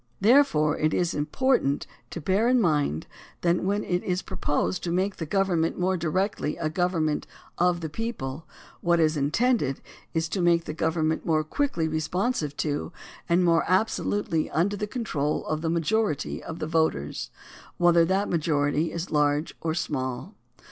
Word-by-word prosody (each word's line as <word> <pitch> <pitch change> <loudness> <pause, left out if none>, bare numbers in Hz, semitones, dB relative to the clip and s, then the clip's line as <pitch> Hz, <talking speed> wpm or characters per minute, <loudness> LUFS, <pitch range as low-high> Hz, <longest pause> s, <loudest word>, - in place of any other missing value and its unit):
Therefore 195 - +4
it 155 0 +1
is 175 -1 +1
impor 250 - +1
tant 140 +1 -1 0.2
to - - -6
bear 190 +8 +1
in 250 0 +4
mind 150 - +1 0.4
that 175 0 +2
when 200 +2 0
it 180 0 -1
is 180 0 -1
proposed 185 0 -1
to 170 - -2
make 190 +3 0
the 160 - -4
government 175 -3 +1
more 185 +1 +1
directly 175 -1 -1
a 155 -2 -2
government 165 -3 0 0.3
of 175 0 +2
the 160 - -3
people, 160 - -5 0.3
what 170 -1 +2
is 155 -1 +3
intended 150 - +1 0.3
is 160 0 0
to 190 - -1
make 170 -1 +3
the - - -4
government 160 0 0
more 155 -2 +1
quickly 170 - -1
responsive 155 - -1
to 145 -1 -2 0.4
and 175 +2 +4
more 165 -1 +4
absolutely 185 -3 0
under 190 +6 +1
the 210 +1 -3
control 165 - -2
of 155 0 -2
the 165 - -1
m^ajority 170 -1 0
of 165 - -7
the - - -3
voters, 160 - 0 0.5
whether 175 -1 +5
that 190 +4 +1
majority 150 -1 +1
is 170 +1 -5
large 150 +1 +1
or 160 -1 -1
small. 130 - -3
165 Hz, 160 wpm, -26 LUFS, 155-190 Hz, 0.5 s, whether